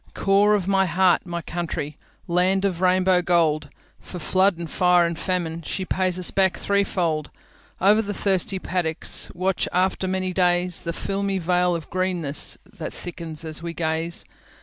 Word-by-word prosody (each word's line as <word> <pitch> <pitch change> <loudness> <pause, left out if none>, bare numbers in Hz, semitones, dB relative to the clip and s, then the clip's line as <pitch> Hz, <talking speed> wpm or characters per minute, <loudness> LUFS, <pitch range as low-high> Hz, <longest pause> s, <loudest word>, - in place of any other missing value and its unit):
Core 200 +2 +3
of 190 -3 -2
my 195 -1 +3
heart, 180 +1 +2
my 170 -1 -4
country! 160 -4 -4 0.3
Land 185 +3 +2
of 185 -4 -1
the - - -3
Rainbow 185 0 +3
Gold, 160 -4 +2 0.3
For 180 - -9
flood 185 +3 +2
and 170 -1 -5
fire 180 +2 +3
and 170 0 -2
famine, 170 -3 -2
She 185 +4 -4
pays 185 -1 0
us 185 - +2
back 190 -2 +2
threefold; 175 -6 0 0.5
Over 205 +4 +5
the 205 -2 -4
thirsty 195 -1 0
paddocks, 175 -4 -1
Watch, 185 +1 0
after 185 +1 0
many 185 0 -1
days, 180 -1 +2
The 170 - -3
filmy 195 +2 -2
veil 180 0 +1
of 165 -3 -7
greennessThat 180 -6 -1
thickens 165 -3 -7
as 160 0 -5
we 170 0 -5
gaze. 165 +1 -1
180 Hz, 160 wpm, -23 LUFS, 170-190 Hz, 0.5 s, Over